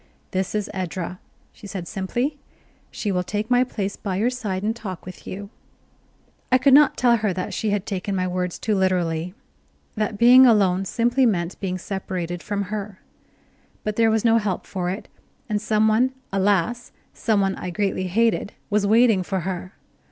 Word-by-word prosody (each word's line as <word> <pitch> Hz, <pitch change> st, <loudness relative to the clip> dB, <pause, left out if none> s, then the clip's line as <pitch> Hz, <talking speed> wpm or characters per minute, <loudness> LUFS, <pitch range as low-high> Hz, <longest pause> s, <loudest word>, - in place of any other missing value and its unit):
"This 190 Hz, +1 st, -2 dB
is 210 Hz, -1 st, -1 dB
Edra," 185 Hz, -1 st, -4 dB, 0.3 s
she 210 Hz, -, -12 dB
said 190 Hz, -3 st, -6 dB
simply. 240 Hz, +9 st, -2 dB, 0.5 s
"She 205 Hz, -, -3 dB
will 180 Hz, -1 st, +1 dB
take 210 Hz, +5 st, -3 dB
my 245 Hz, 0 st, +5 dB
place 205 Hz, -5 st, -3 dB
by 195 Hz, -3 st, -4 dB
your 225 Hz, +6 st, +1 dB
side 205 Hz, -7 st, -3 dB
and 220 Hz, +2 st, 0 dB
talk 190 Hz, -7 st, -7 dB
with 185 Hz, 0 st, -10 dB
you." 200 Hz, +2 st, -7 dB, 1.0 s
I 255 Hz, -, +7 dB
could 265 Hz, +1 st, +4 dB
not 295 Hz, +1 st, +6 dB
tell 240 Hz, -2 st, +4 dB
her 210 Hz, -2 st, 0 dB
that 185 Hz, 0 st, -4 dB
she 220 Hz, -, -1 dB
had 205 Hz, -1 st, -1 dB
taken 195 Hz, 0 st, -3 dB
my 185 Hz, -1 st, 0 dB
words 180 Hz, -1 st, -2 dB
too 215 Hz, -, -1 dB
literally, 180 Hz, -2 st, 0 dB, 0.6 s
that 215 Hz, -1 st, -2 dB
being 250 Hz, +3 st, +8 dB
alone 195 Hz, -4 st, +3 dB
simply 240 Hz, +5 st, +2 dB
meant 175 Hz, -4 st, -1 dB
being 185 Hz, -2 st, -2 dB
separated 180 Hz, -2 st, -4 dB
from 205 Hz, -1 st, -2 dB
her; 205 Hz, -2 st, -5 dB, 0.8 s
but 215 Hz, -1 st, -2 dB
there 225 Hz, 0 st, +4 dB
was 220 Hz, +1 st, +1 dB
no 230 Hz, 0 st, +5 dB
help 205 Hz, -4 st, -2 dB
for 180 Hz, -2 st, -3 dB
it, 190 Hz, +4 st, -5 dB, 0.4 s
and 210 Hz, -3 st, -1 dB
some 215 Hz, 0 st, +2 dB
one, 240 Hz, +4 st, +3 dB, 0.2 s
alas! 205 Hz, +4 st, +1 dB, 0.2 s
some 220 Hz, -2 st, +1 dB
one 195 Hz, -1 st, +1 dB
I 180 Hz, -, -5 dB
greatly 185 Hz, 0 st, -1 dB
hated 220 Hz, +2 st, +1 dB, 0.2 s
was 205 Hz, -1 st, +2 dB
waiting 225 Hz, -2 st, +5 dB
for 190 Hz, 0 st, -2 dB
her. 185 Hz, +1 st, -5 dB
200 Hz, 180 wpm, -23 LUFS, 185-225 Hz, 1.0 s, being